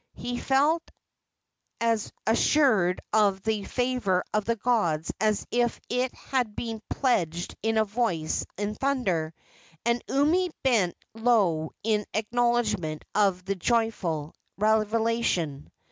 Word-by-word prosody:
He 245 +1 -4
felt 290 +5 +2 1.0
as 230 -2 0
assured 220 -6 +3
of 200 -3 +3
the 215 -2 -1
favor 245 -8 0
of 210 -1 +1
the 230 - +1
gods 190 -10 0
as 215 -1 +1
if 240 -1 +1
it 250 +1 0
had 245 -6 -2
been 225 -2 -4
pledged 175 - 0
in 225 +1 0
a 220 - +4
voice 200 -8 -1
of 210 +1 -3
thunder, 195 -13 0 0.5
and 235 0 +1
Umi 325 +7 +2
bent 220 -10 +2 0.2
low 205 -9 +2
in 210 -1 +1
acknowledgment 220 -8 0
of 195 -3 +2
the 195 - 0
joyful 185 -7 -1 0.2
revelation. 215 -7 +1
220 Hz, 115 wpm, -27 LUFS, 190-240 Hz, 1.0 s, a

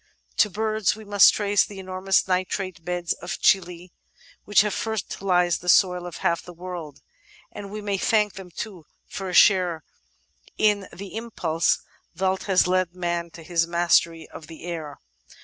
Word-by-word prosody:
To 210 - +4
birds 215 +1 0
we 220 - -11
must 205 -1 +6
trace 205 -1 +2
the 200 - -9
enormous 190 0 0
nitrate 185 -1 -2
beds 175 0 -2
of 180 +5 -6
Chili 180 -2 +1 0.5
which 205 -1 +5
have 210 -1 -1
fertilised 185 -5 0
the 180 - -4
soil 180 0 +4
of 170 -1 -8
half 170 0 +2
the 180 - -12
world, 175 -4 -8 0.5
and 200 -1 -8
we 215 +1 -6
may 200 -2 -2
thank 210 -3 +2
them 195 -3 -10
too 180 -3 -8 0.2
for 195 -1 -6
a - - -5
share 180 -5 +4 0.7
in 205 -2 +2
the 195 +2 -9
impulse 180 -8 -1 0.3
thalt 190 +1 -1
has 190 -3 +3
led 180 -1 0
man 170 -1 -2
to 165 0 -12
his 165 0 0
mastery 170 -1 +2
of 155 - -11
the 160 -1 -12
air. 160 -4 -6
185 Hz, 165 wpm, -24 LUFS, 170-200 Hz, 0.7 s, must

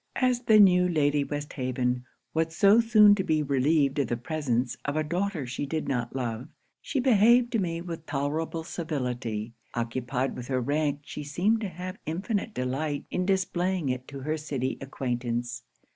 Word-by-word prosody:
'As 255 -2 +2
the 215 -1 +6
new 180 -2 +6
Lady 145 -3 +2
Westhaven 130 -4 -2 0.3
was 160 0 0
so 200 +5 +6
soon 215 -3 +7
to 200 -2 0
be 155 -3 +1
relieved 140 +1 +2
from 140 - +1
the 120 - -1
presence 125 -3 -1
of 145 - -2
a 155 - +1
daughter 175 -1 -2
she 125 +3 -4
did 155 +2 -2
not 120 -1 -2
love, 120 0 -3 0.3
she 280 - -2
behaved 240 0 +5
to 230 - +1
me 170 -3 -2
with 165 -2 -7
tolerable 155 +3 -2
civility. 125 -10 -3 0.2
Occupied 125 +2 -2
with 125 -1 -7
her 130 -1 0
rank, 145 +2 0
she 150 +1 -7
seemed 185 +10 +1
to 205 - -2
have 185 +1 -7
infinite 200 +6 -2
delight 140 +4 -2
in 180 0 -1
displaying 185 -4 0
it 125 0 -3
to 140 -1 -8
her 155 +3 -1
city 135 -4 -2
acquaintance. 120 -2 -3
150 Hz, 170 wpm, -27 LUFS, 130-180 Hz, 0.3 s, soon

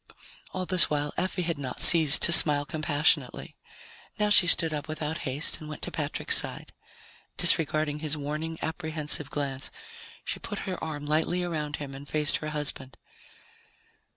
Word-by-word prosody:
All 185 -1 -5
this 185 -1 +5
while 145 -1 -3
Effie 185 0 -3
had 165 -3 -4
not 130 -3 -7
ceased 160 -4 +6
to - - +8
smile 145 -3 +7
compassionately. 150 -3 -1 0.6
Now 210 0 0
she 185 -3 +5
stood 165 -1 +2
up 150 0 -5
without 155 +1 -5
haste 140 +5 +1
and 155 - -11
went 155 - -9
to - - -5
Patrick's - - -1
side. - - -4 0.6
Disregarding 155 -1 +1
his 155 -1 -4
warning, 155 +3 -5
apprehensive 155 -3 -2
glance, 135 -2 -4 0.6
she - - -5
put - - -7
her 185 -2 -5
arm 150 -2 -6
lightly 160 +4 -1
around 150 -4 -4
him 140 -2 -8
and 140 +1 -11
faced 150 -1 +2
her 155 - -6
husband. 145 -4 -6
155 Hz, 155 wpm, -26 LUFS, 145-160 Hz, 0.6 s, to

